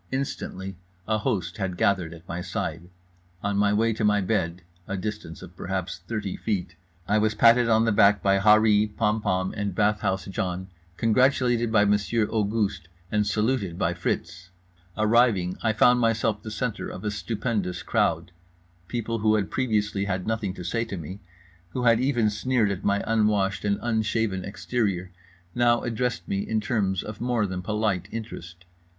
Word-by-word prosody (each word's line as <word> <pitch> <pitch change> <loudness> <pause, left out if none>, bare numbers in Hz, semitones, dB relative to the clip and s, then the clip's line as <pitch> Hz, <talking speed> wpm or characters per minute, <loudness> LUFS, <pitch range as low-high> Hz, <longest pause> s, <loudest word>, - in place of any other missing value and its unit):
Instantly 95 -8 -4 0.3
a 110 0 +1
host 90 -3 -2
had 95 -3 -3
gathered 90 -5 +1
at 85 +1 -13
my 85 +1 -4
side. 85 0 -4 0.5
On 100 0 0
my 100 0 +3
way 110 +2 +2
to 110 - -3
my 105 -1 +4
bed—a 90 -1 -3
distance 105 -4 -6
of 90 -1 -12
perhaps 95 0 -4
thirty 105 -4 -3
feet—I 90 -1 -3
was 110 0 +1
patted 115 0 +5
on 110 0 +4
the 115 - +2
back 100 -1 +4
by 100 0 +3
Harree, 105 +1 +5
Pompom 105 -3 0
and 100 -3 -3
Bathhouse 105 -3 +1
John, 95 -1 -3 0.3
congratulated 120 0 +2
by 105 -2 +4
Monsieur 105 +2 +2
Auguste, 105 -4 -1 0.2
and 105 -1 +1
saluted 105 -4 0
by 90 -3 +1
Fritz. 85 0 -3 0.5
Arriving, 110 -4 +3
I 110 - +2
found 125 +3 +4
myself 115 -2 +1
the 110 - -7
centre 115 0 -3
of - - -8
a 105 - -1
stupendous 100 -5 -2
crowd. 85 +2 0 0.6
People 115 0 -2
who 110 0 +3
had 100 -2 -1
previously 105 -5 0
had 95 -2 -2
nothing 110 -4 -2
to 90 - -7
say 115 +6 -1
to 100 -4 -6
me, 90 +4 -7 0.5
who 125 - -2
had 115 -1 +5
even 120 -5 +2
sneered 110 0 +1
at 100 0 -4
my 100 0 +1
unwashed 105 -3 +1
and 100 -1 +1
unshaven 110 -4 0
exterior, 100 -3 -2 0.4
now 120 +1 +3
addressed 120 -6 -2
me 100 - -1
in 110 +2 -1
terms 105 -4 0
of 105 0 -8
more 120 -3 +1
than 95 -2 -4
polite 105 -2 -1
interest. 90 -6 -8
105 Hz, 160 wpm, -26 LUFS, 95-110 Hz, 0.6 s, patted